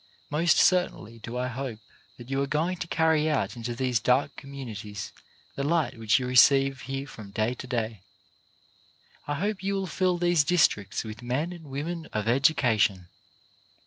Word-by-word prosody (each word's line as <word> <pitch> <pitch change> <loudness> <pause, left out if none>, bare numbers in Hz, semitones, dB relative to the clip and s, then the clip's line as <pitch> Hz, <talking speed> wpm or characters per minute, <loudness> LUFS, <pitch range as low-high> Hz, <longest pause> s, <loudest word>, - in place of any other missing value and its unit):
Most 160 +3 +3
certainly 175 - +2
do 115 +2 -6
I 125 0 -1
hope 130 -2 -5 0.4
that 120 - -11
you 135 0 +1
are 140 - 0
going 165 +6 0
to 170 - -5
carry 160 -1 +2
out 150 -3 0
into 120 0 -4
these 125 -2 0
dark 125 +5 +2
communities 110 -8 -7 0.4
the - - -3
light 155 -5 0
which 110 -1 +3
you 130 - -2
receive 135 +2 +5
here 135 +2 -4
from 110 -7 -11
day 110 +4 0
to 125 - -9
day. 115 -5 -3 1.3
I 145 - -1
hope 200 +5 -2
you 195 +1 -1
will 195 -1 -1
fill 180 +1 0
these 175 -3 +3
districts 145 - +2
with 110 0 -8
men 135 +8 -2
and 170 -3 -11
women 160 +4 -4
of 110 0 -2
education. 115 - +2
135 Hz, 170 wpm, -27 LUFS, 115-160 Hz, 1.3 s, receive